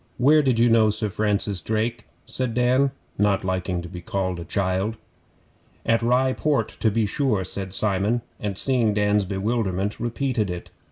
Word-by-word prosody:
'Where 150 +5 +5
did 130 -5 +1
you 120 +1 +4
know 115 -2 +4
Sir 105 0 -1
Francis 100 -2 0
Drake?' 110 +4 -2 0.2
said 125 -3 -3
Dan, 125 +3 +3 0.3
not 105 -1 +2
liking 90 -1 -2
being 90 0 -9
called 95 -1 -2
a - - -5
child. 100 +3 -1 0.9
'At 115 0 +2
Rye 125 +2 +2
Port, 140 -8 0
to 110 - +3
be 110 +1 +1
sure,' 110 -3 0
said 95 +1 -4
Simon, 105 +4 +2 0.2
and 100 -2 -3
seeing 120 -5 +2
Dan's 105 -1 +2
bewilderment, 100 0 -2
repeated 120 -2 -1
it. 90 -1 -6
105 Hz, 160 wpm, -24 LUFS, 95-120 Hz, 0.9 s, Where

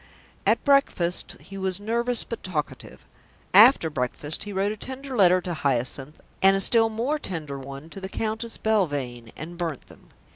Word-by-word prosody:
At - - +3
breakfast 275 - +2
he 195 0 -10
was 190 0 -1
nervous 235 +3 0
but 230 - -7
talkative. 155 -6 -5 0.5
After 215 -2 +7
breakfast 145 - -1
he 205 - -6
wrote 195 +1 0
a - - -4
tender 260 +4 -7
letter 185 -4 +5
to 180 -1 -4
Hyacinth 135 0 -2 0.2
and 195 0 +6
a - - +1
still 225 +3 +4
more 245 +8 -2
tender 155 - -5
one 135 +3 -9
to 195 - -8
the 190 - -6
Countess 225 +2 -3
Belvane, 145 - -1
and 170 +2 -8
burnt 165 -6 -4
them. - - -18
190 Hz, 170 wpm, -25 LUFS, 150-225 Hz, 0.5 s, After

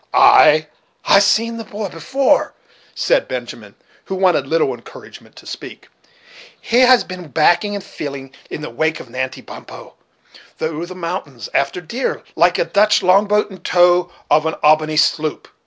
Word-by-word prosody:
"Ay! 155 +1 +6 0.4
I - - +2
have 200 - +7
seen 230 +3 +1
the 225 - -6
boy 210 -1 -6
before," 270 - 0 0.4
said - - +1
Benjamin, - - -7 0.3
who 190 - -4
wanted 180 -7 +1
little 165 +3 +1
encouragement - - -14
to - - -15
speak; - - -10 0.7
"he 240 +1 0
has 255 -1 +5
been 185 -2 -9
backing 175 +7 +2
and 200 - -6
filling 140 -7 -8 0.2
in - - -6
the 150 - -7
wake 155 +6 -1
of 120 - -12
Natty 130 +1 -5
Bumppo, - - -12 0.6
through 160 +2 -4
the 185 - -10
mountains, 165 - -6
after 140 +6 -1
deer, 235 +10 -4
like - - +3
a - - +1
Dutch 210 - +2
long 195 +3 +4
boat 210 0 0
in 190 - -11
tow 175 0 +2 0.2
of 155 +1 +3
an 160 - -2
Albany 155 0 +3
sloop. 155 0 0
175 Hz, 165 wpm, -18 LUFS, 155-205 Hz, 0.7 s, have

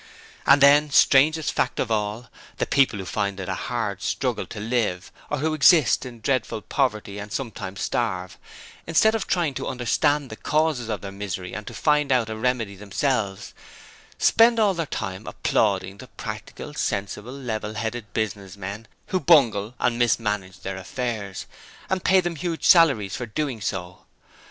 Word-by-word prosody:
And 140 - +6
then, 145 +1 +6
strangest 150 +3 +4
fact - - -1
of 115 - -1
all, 110 +2 -2 0.3
the - - 0
people 135 -6 +2
who 95 - -6
find 100 +2 -2
it 95 - -5
a - - -1
hard - - -3
struggle - - -2
to - - -8
live, 105 -5 -1 0.2
or 150 - -1
who 155 +3 0
exist 155 -3 +5
in 120 -2 -11
dreadful 130 -4 -1
poverty 105 -7 -1
and 105 +1 -8
sometimes 100 -7 -5
starve, 90 0 -2 0.5
instead 195 +7 +4
of 225 - -2
trying 170 -6 +1
to - - -4
understand 140 +3 0
the - - -6
causes 150 -4 0
of 105 - -3
their 100 - -6
misery 95 -2 -5
and 105 0 -6
to - - -7
find 150 -2 +2
out 120 -4 +2
a - - -3
remedy 115 -3 -1
themselves, 100 0 -2 0.6
spend 230 0 +5
all 210 -3 +4
their 165 -3 -3
time 95 -2 -5
applauding 95 -2 0
the 130 - -10
Practical, 110 +7 -8
Sensible, 105 -2 -3
Level 110 -5 -4
headed 110 0 -4
Business 100 -3 -3
men, 100 +3 -7 0.2
who 185 - +1
bungle 120 - +4
and 120 -1 +1
mismanage 105 -6 0
their 95 0 -5
affairs, 100 -1 -4 0.5
and 190 -1 0
pay 190 0 +5
them 175 -2 -3
huge 170 0 -3
salaries 135 - +5
for 120 - -5
doing 130 0 -3
so. 90 -2 -4
115 Hz, 165 wpm, -24 LUFS, 100-145 Hz, 0.6 s, And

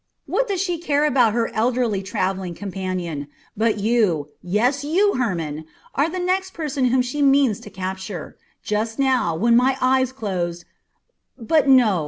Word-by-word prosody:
What - - 0
does 390 -3 -1
she 355 -3 -1
care 295 -3 +1
about 250 -7 +3
her 230 0 -1
elderly 235 -3 0
travelling 190 -2 -2
companion? 185 -6 -4 0.3
But 220 0 +1
you 205 -9 +1
yes, 240 +10 0
you, 380 +8 +2
Hermon 165 -10 -2 0.3
are 290 +4 +1
the 370 - -5
next 375 +1 -1
person 290 -5 -1
whom 250 +1 +3
she 255 +4 -3
means 275 -6 +4
to - - -11
capture. 190 -2 -6 0.3
Just 220 +2 -2
now, 255 -11 +1
when 230 +7 +3
my 255 +2 +3
eyes 260 0 +2
closed 180 -8 -4 0.7
But 290 +5 +2
no! 235 -8 +5
235 Hz, 155 wpm, -22 LUFS, 190-275 Hz, 0.7 s, no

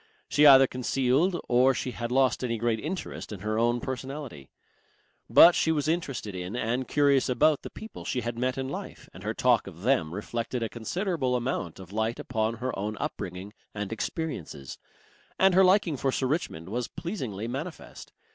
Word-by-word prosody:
She 150 0 +5
either 135 -1 +9
concealed 135 +7 +1
or 130 +2 +4
she 125 - -3
had 120 0 -5
lost 130 0 +2
any 115 -2 -1
great 115 0 0
interest 170 - -5
in 100 -4 -7
her 110 +1 -1
own 120 +1 +2
personality. 130 - -6 0.8
But 175 - +9
she 160 - +2
was 150 -2 0
interested 140 - -2
in 90 +3 -5
and 125 +1 -1
curious 140 -3 +3
about 140 +4 +3
the - - -8
people 220 - -10
she 125 - -2
had 120 +1 -3
met 125 +2 -1
in 130 0 -2
life, 140 - -7
and - - -11
her - - -3
talk - - +3
of 85 - -10
them 120 -11 +2
reflected 115 +3 -3
a 115 - -2
considerable 140 - -2
amount 120 - -2
of 95 0 -11
light 110 +2 -1
upon 110 -1 -1
her 125 +3 -3
own 105 +1 -3
upbringing 95 +3 -5 0.2
and 105 +1 -3
experiences. 90 - -5 0.6
And 190 -1 +5
her 190 +2 +6
liking 185 -5 +3
for 135 +1 0
Sir 130 - -1
Richmond 125 - -2
was 120 +2 -2
pleasingly 125 - -5
manifest. 140 +8 -7
125 Hz, 180 wpm, -27 LUFS, 110-145 Hz, 0.8 s, either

